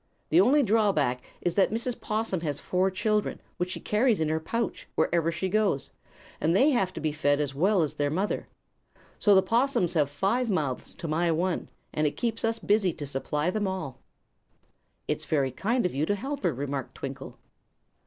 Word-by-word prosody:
The 165 +3 +6
only 275 +8 +5
drawback 195 - +2 0.2
is 175 - 0
that 195 0 +3
Mrs. 235 +2 -2
'Possum 215 -5 -1
has 145 -4 -1
four 185 +1 +1
children, 210 +2 0 0.2
which 180 +1 -1
she - - -4
carries 220 0 +2
in 160 -1 +1
her 160 0 +1
pouch 230 +6 -3
wherever 165 -1 +2
she 190 +3 -2
goes, 200 -7 +1 0.5
and 165 +3 +2
they 275 +9 +5
have 195 -8 +1
to - - -6
be 155 -1 -1
fed 145 -1 +1
as 145 -2 -1
well 185 +5 +3
as 150 - -2
their 145 0 0
mother. 190 +7 -1 0.7
So 205 -2 +5
the 190 - +6
'possums 235 - +1
have 150 -5 +2
five 200 - 0
mouths 150 -10 -2
to 170 - -6
my 165 +2 +1
one, 175 +2 -1 0.2
and 155 0 +1
it 145 - -4
keeps 230 -2 -1
us 225 0 +1
busy 205 -4 +2
to 150 -2 -6
supply 150 +4 -1
them 205 0 -1
all." 185 -9 -4 1.1
"It's - - -2
very 140 -4 +1
kind 230 - 0
of 180 - 0
you 145 +4 0
to 205 - +2
help 275 +7 -4
her," 175 - +2
remarked 140 -1 -4
Twinkle. - - -7
180 Hz, 195 wpm, -27 LUFS, 150-215 Hz, 1.1 s, The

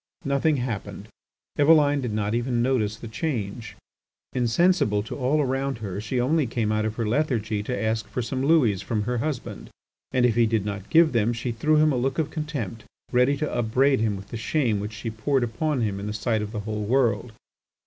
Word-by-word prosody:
Nothing 140 +2 +2
happened. 120 -5 -5 0.5
Eveline 145 -1 +5
did 120 -3 -3
not 105 0 -1
even 120 0 0
notice 115 -5 +1
the 115 +1 -9
change. 110 -3 -4 0.6
Insensible 120 - +2
to 105 - -6
all 140 +3 +1
around 135 -1 -1
her, 100 -3 -5
she 125 +4 -2
only 145 +3 +2
came 110 -2 -1
out 110 0 0
of 110 0 -2
her 115 - -2
lethargy 110 -5 0
to 125 +4 -3
ask 110 0 -1
for 125 - -3
some 130 +3 -3
louis 135 - +3
from 110 -3 -2
her 120 +2 -1
husband, 145 -1 -4 0.4
and 125 -1 +3
if 120 - +3
he 115 0 +3
did 110 -3 0
not 105 -1 -5
give 165 -1 +5
them 115 -1 +1
she 120 +1 -3
threw 150 +7 +1
him 155 0 +4
a - - 0
look 135 +2 -1
of 155 -2 -1
contempt, 140 - -4 0.3
ready 125 +3 +3
to 150 - -2
upbraid 130 +4 +2
him 110 -2 +1
with 100 0 -9
the 115 - -5
shame 115 -3 0
which 105 +2 -5
she 110 +2 -5
poured 125 +4 0
upon 130 +4 -1
him 100 -3 -1
in 100 - -5
the 105 - -3
sight 110 0 0
of 105 0 -5
the 105 -2 -4
whole 105 0 -4
world. 115 0 +1
120 Hz, 210 wpm, -25 LUFS, 110-135 Hz, 0.6 s, Eveline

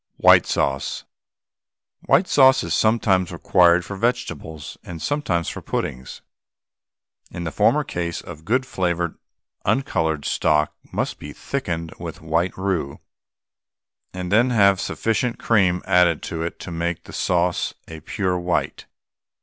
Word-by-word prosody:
WHITE - - +6
SAUCE. 70 0 -1 1.0
White 185 - +4
sauce 130 -2 +5
is - - -2
sometimes 100 -5 +2
required 85 0 +3
for 100 - -6
vegetables 85 -9 -3
and 85 -2 -8
sometimes 95 - -1
for - - -5
puddings. 65 0 -4 1.1
In 85 - -6
the 80 - -3
former - - +3
case 85 -1 -3
some 80 -3 -9
good 125 +9 0
flavoured, 85 -6 -2 0.4
uncoloured 80 - 0
stock 75 -1 +1 0.2
must - - -2
be - - -8
thickened 85 -12 -4
with - - -7
white 80 +3 -1
roux, 90 -8 -2 1.1
and 90 0 -5
then 120 +5 +4
have 100 -5 +4
sufficient 115 +1 -1
cream 95 -6 +2
added 90 -4 +3
to 80 - -4
it 85 +1 -4
to 90 - -7
make 85 0 -3
the - - -12
sauce 90 -1 0
a 80 -1 -8
pure 90 +2 -2
white. 90 0 -2
90 Hz, 135 wpm, -22 LUFS, 85-100 Hz, 1.1 s, WHITE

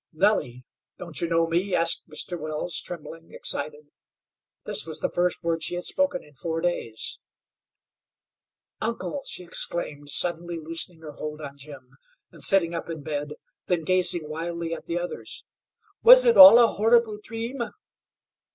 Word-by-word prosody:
"Nellie, 155 - 0 0.3
don't 170 -5 -5
you 170 - -2
know 165 0 +2
me?" 175 +3 -1
asked 165 0 +1
Mr. 155 +3 -4
Wells, 155 +2 -2
trembling, 165 -1 -9
excited. 150 -1 -3 0.7
This - - +3
was 160 - -2
the - - -2
first 180 0 -1
word 165 -1 -1
she - - -2
had 175 - -5
spoken 280 +3 0
in 150 - -20
four 160 +4 -4
days. 165 -10 -4 1.6
"Uncle!" 235 +5 -4
she - - -4
exclaimed, 150 -4 -3
suddenly 170 +2 -2
loosening 165 +1 -4
her 155 -2 -9
hold 150 +1 -7
on 140 -2 -9
Jim, 140 -2 -12 0.4
and - - -6
sitting 175 -4 +5
up 170 - -6
in 160 -3 -7
bed, 150 0 -4 0.3
then 175 -2 0
she - - -13
gazed 180 0 +6
wildly 165 +2 -5
at 165 - -9
the 170 - -2
others. 175 0 -6 0.6
"Was - - +9
it 475 -1 +4
all 280 -4 +11
a 240 - +7
horrible 225 0 +1
dream?" 230 +5 -6
170 Hz, 155 wpm, -24 LUFS, 155-185 Hz, 1.6 s, all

